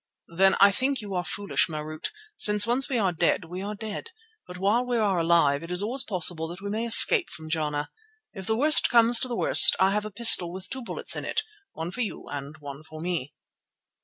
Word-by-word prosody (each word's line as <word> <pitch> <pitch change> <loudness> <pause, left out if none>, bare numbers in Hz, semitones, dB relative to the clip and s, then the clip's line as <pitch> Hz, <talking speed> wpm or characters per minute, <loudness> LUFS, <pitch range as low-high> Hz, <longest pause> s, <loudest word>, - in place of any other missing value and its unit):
"Then 190 +2 +3
I 200 +1 +5
think 265 +5 -2
you 205 -3 -8
are 180 -1 -3
foolish, 205 +2 -2
Marût, 155 0 -7 0.3
since 210 - +3
once 245 +3 0
we 260 - -2
are 195 -5 0
dead, 170 0 -1
we 180 +3 -9
are 205 +2 -6
dead; 220 - -8 0.4
but 180 - -11
while 205 +6 0
we 245 -1 -3
are 200 -5 -1
alive 165 -4 +1
it 165 - -11
is 180 +2 0
always 250 +6 +1
possible 175 -8 0
that 175 +2 -10
we 200 +1 -7
may 225 +2 -4
escape 360 - +6
from 155 0 -11
Jana. 150 -2 -3 0.4
If 190 -3 -10
the 220 - -1
worst 305 +4 +4
comes 235 -1 +4
to - - -2
the 240 -2 -5
worst - - +6
I 190 +1 +2
have 210 +1 -2
a - - -6
pistol 200 -5 +4
with 185 +1 -10
two 265 - -6
bullets 235 - -2
in - - -6
it, - - -3 0.3
one 165 +2 -7
for 250 - -6
you 220 - -6
and 145 +1 -8
one 145 -1 -11
for 155 0 -13
me." 165 -5 -5
195 Hz, 225 wpm, -24 LUFS, 165-230 Hz, 0.4 s, escape